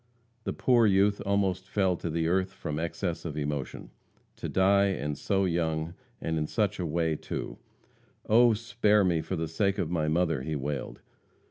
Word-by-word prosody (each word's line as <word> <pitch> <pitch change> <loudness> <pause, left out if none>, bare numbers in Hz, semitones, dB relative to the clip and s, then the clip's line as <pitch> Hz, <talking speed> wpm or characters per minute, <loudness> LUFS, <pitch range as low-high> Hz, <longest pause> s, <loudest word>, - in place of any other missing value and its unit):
The - - -1
poor 120 -3 +4
youth 100 +1 +3
almost 95 -2 0
fell 95 -2 +2
to 85 - -4
the 80 0 0
earth 95 +2 +1
from 75 0 -4
excess 85 +1 -3
of 75 -3 -5
emotion. 75 -2 -4 0.5
To - - -5
die, 100 +1 +4
and 75 -6 -2
so 95 +6 0
young, 80 -2 -1 0.3
and 80 -1 -2
in 75 - -1
such 105 0 0
a 90 - -1
way, 80 0 0
too! - - -6 0.7
"Oh, 120 +1 +6
spare 105 -2 +2
me 85 -3 +2
for 95 - -4
the 80 -1 -2
sake 100 +5 0
of 85 -5 -2
my 80 -3 0
mother!" 80 -2 +1
he 75 +3 -3
wailed. 70 0 -4
85 Hz, 175 wpm, -28 LUFS, 80-100 Hz, 0.7 s, Oh